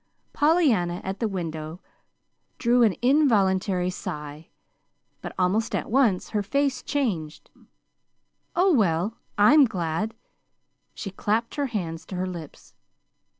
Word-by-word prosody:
Pollyanna 275 Hz, -, +2 dB
at 190 Hz, +1 st, -4 dB
the 225 Hz, -, 0 dB
window 165 Hz, -4 st, -5 dB, 0.8 s
drew 245 Hz, +1 st, +3 dB
an 220 Hz, -5 st, +4 dB
involuntary 195 Hz, -9 st, +2 dB
sigh; 150 Hz, -3 st, -7 dB, 0.7 s
but -, -, -6 dB
almost 205 Hz, +6 st, +1 dB
at -, -, -3 dB
once 235 Hz, -8 st, +2 dB
her 210 Hz, -, -1 dB
face 275 Hz, +6 st, 0 dB
changed. 190 Hz, -, -3 dB, 1.0 s
"Oh, 365 Hz, +1 st, +4 dB
well, 200 Hz, -, +1 dB, 0.2 s
I'm 270 Hz, +8 st, +7 dB
glad 185 Hz, +1 st, -2 dB, 0.4 s
" -, -, -49 dB
She 195 Hz, -, -6 dB
clapped 220 Hz, +4 st, -1 dB
her 285 Hz, -1 st, -1 dB
hands 170 Hz, -8 st, -4 dB
to 190 Hz, -, -6 dB
her 180 Hz, +1 st, -1 dB
lips. 170 Hz, -5 st, -9 dB
205 Hz, 120 wpm, -25 LUFS, 175-245 Hz, 1.0 s, I'm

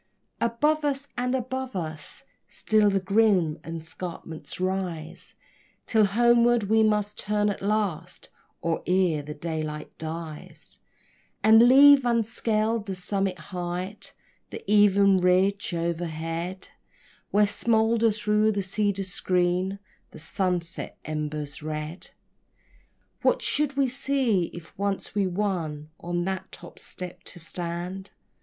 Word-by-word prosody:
Above 295 Hz, +7 st, +1 dB
us 285 Hz, -1 st, -1 dB
and 250 Hz, +1 st, 0 dB
above 260 Hz, 0 st, -3 dB
us 155 Hz, -3 st, -4 dB, 0.2 s
still 215 Hz, -1 st, +2 dB
the 195 Hz, -1 st, +2 dB
grim 190 Hz, -5 st, +2 dB
escarpments 165 Hz, -1 st, -7 dB
rise, 185 Hz, -4 st, -4 dB, 0.5 s
Till 220 Hz, -2 st, +4 dB
homeward 235 Hz, +2 st, +4 dB
we 220 Hz, +2 st, +3 dB
must 210 Hz, -1 st, +1 dB
turn 210 Hz, 0 st, +1 dB
at -, -, -7 dB
last, 195 Hz, -4 st, -2 dB, 0.3 s
or 165 Hz, -1 st, 0 dB
ere 180 Hz, -4 st, +2 dB
the 150 Hz, +1 st, -8 dB
daylight 155 Hz, -1 st, -5 dB
dies, 160 Hz, -1 st, -6 dB, 0.6 s
And 225 Hz, +2 st, +7 dB
leave 280 Hz, +1 st, +8 dB
unscaled 225 Hz, -2 st, +1 dB
the 190 Hz, -, -3 dB
summit 190 Hz, 0 st, 0 dB, 0.2 s
height, 180 Hz, +3 st, -5 dB, 0.3 s
the -, -, -8 dB
even 200 Hz, -1 st, +5 dB
ridge 190 Hz, +3 st, +2 dB
o'erhead, 170 Hz, +1 st, -3 dB, 0.6 s
Where 210 Hz, +1 st, +4 dB
smolder 225 Hz, +2 st, +2 dB
through 210 Hz, +1 st, +2 dB
the 200 Hz, -1 st, -1 dB
cedar 200 Hz, 0 st, 0 dB
screen 180 Hz, +1 st, 0 dB, 0.3 s
the -, -, -13 dB
sunset 175 Hz, +1 st, -3 dB
embers 150 Hz, -1 st, -4 dB
red. 155 Hz, +3 st, -5 dB, 1.1 s
What -, -, +2 dB
should 285 Hz, -2 st, 0 dB
we 275 Hz, -, +4 dB
see, 255 Hz, -7 st, +1 dB
if 170 Hz, -2 st, -11 dB
once 200 Hz, -1 st, -2 dB
we 200 Hz, -2 st, +1 dB
won 170 Hz, -6 st, -2 dB
on 175 Hz, 0 st, -2 dB
that 190 Hz, 0 st, -4 dB
top -, -, -10 dB
step 180 Hz, -1 st, -7 dB
to 175 Hz, -, -8 dB
stand? 175 Hz, +3 st, -5 dB
190 Hz, 120 wpm, -26 LUFS, 170-215 Hz, 1.1 s, leave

